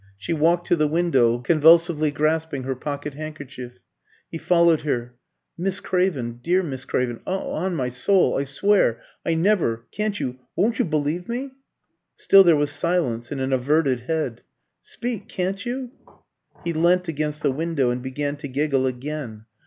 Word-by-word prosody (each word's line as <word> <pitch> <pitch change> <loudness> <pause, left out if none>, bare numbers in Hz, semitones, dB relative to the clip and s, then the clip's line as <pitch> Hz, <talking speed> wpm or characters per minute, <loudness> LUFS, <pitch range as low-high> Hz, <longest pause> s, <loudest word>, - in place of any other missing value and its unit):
She 100 +11 -3
walked 170 +3 +2
to - - +3
the 155 -2 +2
window, 145 -8 +2
convulsively 160 +3 +4
grasping 155 -1 -1
her 135 0 -3
pocket 145 +2 -5
handkerchief. 140 -5 -8 0.5
He 165 - -5
followed 170 -2 +3
her. 125 -5 -2 0.5
"Miss 190 +2 -1
Craven 145 -13 -1
dear 180 +6 +2
Miss 135 -5 -6
Craven 120 -3 -1
on 185 -1 -2
my 130 -5 -1
soul 180 +10 +3
I 140 - -1
swear 140 - +2 0.2
I 165 - 0
never 160 - +1
Can't 210 -1 -2
you 130 0 -4 0.2
won't 225 +5 +1
you - - +3
believe 155 +3 -2
me?" 260 +3 -3 0.6
Still 195 0 +6
there 170 -3 +5
was 145 0 +1
silence 145 -9 -1
and 140 - -3
an 135 0 -1
averted 135 0 +2
head. 125 -2 -3 0.4
"Speak, 240 -4 -5
can't 190 +2 -2
you!" 250 0 -4 0.7
He 170 - -2
leant 175 +3 +2
against 150 -1 -3
the 145 - +3
window 145 -3 0
and 125 +1 -3
began 145 +3 -3
to 145 0 -6
giggle 135 -1 0
again. 130 -4 -5
155 Hz, 160 wpm, -23 LUFS, 130-175 Hz, 0.7 s, Still